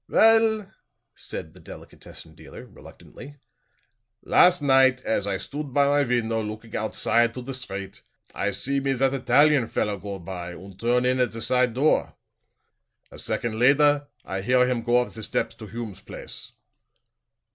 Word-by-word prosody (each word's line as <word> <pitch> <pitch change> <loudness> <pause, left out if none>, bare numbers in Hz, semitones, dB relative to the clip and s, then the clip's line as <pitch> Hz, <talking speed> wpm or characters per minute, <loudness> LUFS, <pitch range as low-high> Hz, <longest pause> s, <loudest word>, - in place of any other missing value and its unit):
"Well," 225 -1 +4 0.5
said - - -8
the - - -16
delicatessen 80 - -13
dealer, 80 0 -12
reluctantly, 145 +1 -14 0.9
"last 180 0 +5
night 130 -2 +3
as 100 -2 -1
I 100 -1 -1
stood 140 +5 -7
by 140 0 +4
my 145 +1 +3
window 115 -2 0
looking 110 +1 -7
oudside 115 +2 +1
on 125 - -6
the 135 - -5
street, 100 -7 -7 0.3
I - - -1
see 140 +1 -1
me 135 0 0
that 135 +1 +1
Italian 135 0 +3
feller 105 -2 -2
go 100 0 -6
by 90 0 -7
und 95 +2 -13
turn 120 +2 +1
in 130 0 +1
at 125 -3 +1
the 115 - -6
side 125 0 +1
door; 145 +4 +1 1.0
a - - -10
second 120 -2 -2
lader 145 +3 +4 0.2
I 95 0 -4
hear 125 +4 +3
him 125 -2 -1
go 120 +1 +2
up 125 - -5
the 110 - -6
steps - - -2
to - - -10
Hume's 115 -5 -7
place." - - -9
125 Hz, 160 wpm, -24 LUFS, 110-140 Hz, 1.0 s, last